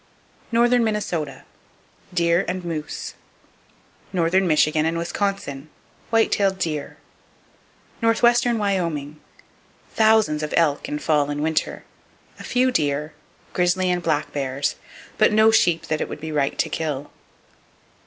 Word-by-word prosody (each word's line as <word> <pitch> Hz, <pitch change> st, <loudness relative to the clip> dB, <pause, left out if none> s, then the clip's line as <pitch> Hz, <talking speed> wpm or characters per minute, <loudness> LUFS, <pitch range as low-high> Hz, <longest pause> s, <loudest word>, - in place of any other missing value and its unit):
Northern 240 Hz, +1 st, +4 dB
Minnesota: 180 Hz, -10 st, -2 dB, 0.7 s
Deer 170 Hz, 0 st, +2 dB
and 185 Hz, -1 st, -3 dB
moose. 160 Hz, -3 st, -5 dB, 1.0 s
Northern 185 Hz, +1 st, +2 dB
Michigan 155 Hz, -1 st, +3 dB
And 165 Hz, +1 st, 0 dB
Wisconsin: 170 Hz, -5 st, -3 dB, 0.4 s
White 225 Hz, -1 st, +3 dB
tailed 195 Hz, -2 st, +1 dB
deer. 155 Hz, -5 st, -3 dB
[Page -, -, -34 dB
158] 230 Hz, -, +1 dB
Northwestern 240 Hz, +1 st, +3 dB
Wyoming: 170 Hz, -8 st, -2 dB, 0.7 s
Thousands 220 Hz, -8 st, +3 dB
of 155 Hz, -, -3 dB
elk 150 Hz, -4 st, +1 dB
in 150 Hz, -, -2 dB
fall 150 Hz, -1 st, +1 dB
and 145 Hz, 0 st, -2 dB
winter; 160 Hz, 0 st, -1 dB, 0.6 s
a -, -, -8 dB
few 255 Hz, +1 st, +1 dB
deer, 150 Hz, -, -1 dB, 0.4 s
grizzly 180 Hz, +1 st, +1 dB
and 180 Hz, 0 st, 0 dB
black 155 Hz, -3 st, -1 dB
bears, 140 Hz, 0 st, -1 dB, 0.5 s
but -, -, +5 dB
no 215 Hz, +1 st, +5 dB
sheep 175 Hz, -6 st, +2 dB
that 155 Hz, -1 st, -2 dB
it -, -, -3 dB
would -, -, -7 dB
be 160 Hz, 0 st, -6 dB
right 145 Hz, -2 st, 0 dB
to -, -, +1 dB
kill. 145 Hz, -3 st, -4 dB
170 Hz, 135 wpm, -22 LUFS, 150-205 Hz, 1.0 s, but